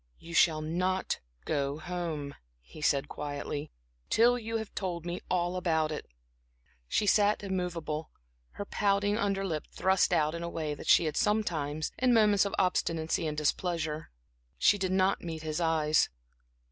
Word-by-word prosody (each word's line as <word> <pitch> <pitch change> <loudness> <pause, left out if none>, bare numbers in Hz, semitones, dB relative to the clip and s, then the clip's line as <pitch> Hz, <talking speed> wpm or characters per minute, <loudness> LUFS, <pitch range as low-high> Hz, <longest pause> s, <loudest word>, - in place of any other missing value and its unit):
"You 170 0 -11
shall 160 -1 +4
not 185 +4 -1 0.3
go 140 -1 -1
home," 160 -4 -4 0.3
he - - -13
said 140 -2 +2
quietly, 145 +1 -5 0.4
"till 240 +2 +4
you 225 0 -3
have 220 -2 -6
told 175 -3 -3
me 175 0 -4
all 175 0 0
about 160 -4 +1
it." 150 - -5 0.8
She 210 - +1
sat 205 0 +3
immovable, 175 -5 -3 0.4
her 205 - -5
pouting 205 +1 +1
under 195 -2 0
lip 160 -5 -3
thrust 190 0 +2
out 155 0 +2
in 170 - -5
a 170 - -3
way 155 -3 -3
that 145 - -9
she 170 - +6
had 155 -1 -2
sometimes, 160 -8 0
in 250 -1 +4
moments 210 -2 +5
of 200 - -2
obstinacy 165 -3 0
and 150 -1 -3
displeasure. 160 0 -1 0.5
She 205 - +4
did 185 -1 -1
not 190 +1 +2
meet 160 -2 -6
his 155 +2 -2
eyes. 155 -2 +3
170 Hz, 160 wpm, -30 LUFS, 155-195 Hz, 0.8 s, she